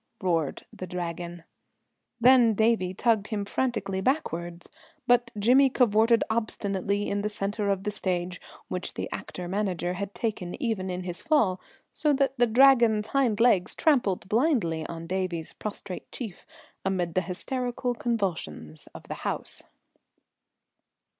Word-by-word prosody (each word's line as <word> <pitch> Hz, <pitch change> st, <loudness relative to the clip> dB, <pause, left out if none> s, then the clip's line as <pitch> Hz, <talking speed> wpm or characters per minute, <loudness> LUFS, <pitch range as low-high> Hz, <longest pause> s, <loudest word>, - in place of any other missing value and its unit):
roared 165 Hz, -6 st, -1 dB
the 185 Hz, -, -7 dB
Dragon. 175 Hz, -1 st, -5 dB, 0.8 s
Then 240 Hz, -2 st, +6 dB
Davie 215 Hz, -4 st, +2 dB
tugged 220 Hz, -1 st, +2 dB
him 205 Hz, -2 st, -2 dB
frantically 200 Hz, -4 st, -1 dB
backwards, 175 Hz, -, -2 dB, 0.4 s
but 245 Hz, -1 st, +3 dB
Jimmy 255 Hz, +6 st, +5 dB
cavorted 230 Hz, -2 st, +4 dB
obstinately 205 Hz, -3 st, -1 dB
in 200 Hz, -, -1 dB
the 210 Hz, -, -1 dB
centre 205 Hz, 0 st, -2 dB
of 195 Hz, -1 st, 0 dB
the 210 Hz, -, -1 dB
stage, 180 Hz, -2 st, -2 dB, 0.3 s
which 180 Hz, 0 st, -4 dB
the -, -, -3 dB
actor 180 Hz, -1 st, -6 dB
manager 180 Hz, -2 st, -1 dB
had 200 Hz, +2 st, -5 dB
taken 205 Hz, -4 st, -3 dB
even 220 Hz, -8 st, -1 dB
in 180 Hz, 0 st, -3 dB
his 175 Hz, -1 st, -6 dB
fall, 225 Hz, -, +2 dB, 0.3 s
so 300 Hz, -2 st, +2 dB
that 270 Hz, -1 st, +1 dB
the 240 Hz, -, +5 dB
Dragon's 230 Hz, -3 st, +5 dB
hind 250 Hz, -6 st, +1 dB
legs 230 Hz, -6 st, +3 dB
trampled 240 Hz, -, +2 dB
blindly 215 Hz, -, +1 dB
on 165 Hz, 0 st, -7 dB
Davie's 180 Hz, -2 st, -3 dB
prostrate 205 Hz, -3 st, -7 dB
chief, 220 Hz, -8 st, -7 dB, 0.4 s
amid 180 Hz, -3 st, -1 dB
the 185 Hz, -, +2 dB
hysterical 245 Hz, +7 st, -3 dB
convulsions 180 Hz, -, -3 dB
of -, -, -9 dB
the -, -, -6 dB
house. -, -, -3 dB
205 Hz, 135 wpm, -27 LUFS, 180-235 Hz, 0.8 s, Then